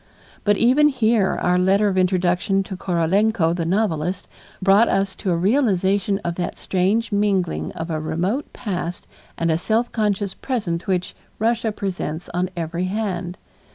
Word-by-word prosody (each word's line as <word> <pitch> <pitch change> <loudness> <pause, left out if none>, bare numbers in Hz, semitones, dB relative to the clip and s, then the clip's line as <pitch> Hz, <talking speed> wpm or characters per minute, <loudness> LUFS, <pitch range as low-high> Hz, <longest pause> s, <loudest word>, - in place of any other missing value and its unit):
But 205 -1 +3
even 260 +6 +5
here 225 -7 +2
our 180 0 +2
letter 195 +3 +3
of 195 - 0
introduction 185 +1 +1
to 190 - -7
Korolenko, 180 +1 +1
the 165 -2 -2
novelist, 180 -2 -1 0.3
brought 200 +4 +5
us 195 0 +1
to 195 - -3
a 170 - +2
realization 195 -2 +2
of 170 - -1
that 175 -1 -3
strange 200 +5 0
mingling 200 -4 0
of 165 +1 -5
a 155 - -1
remote 175 - -2
past 180 -6 -4 0.3
and 165 0 +1
a 160 - +1
self 225 +6 0
conscious 205 -3 0
present 205 -9 -3
which 185 -2 -1 0.2
Russia 230 0 +1
presents 180 -5 -4
on 180 +1 -1
every 170 +2 -2
hand. 185 -3 -3
190 Hz, 155 wpm, -22 LUFS, 175-210 Hz, 0.3 s, even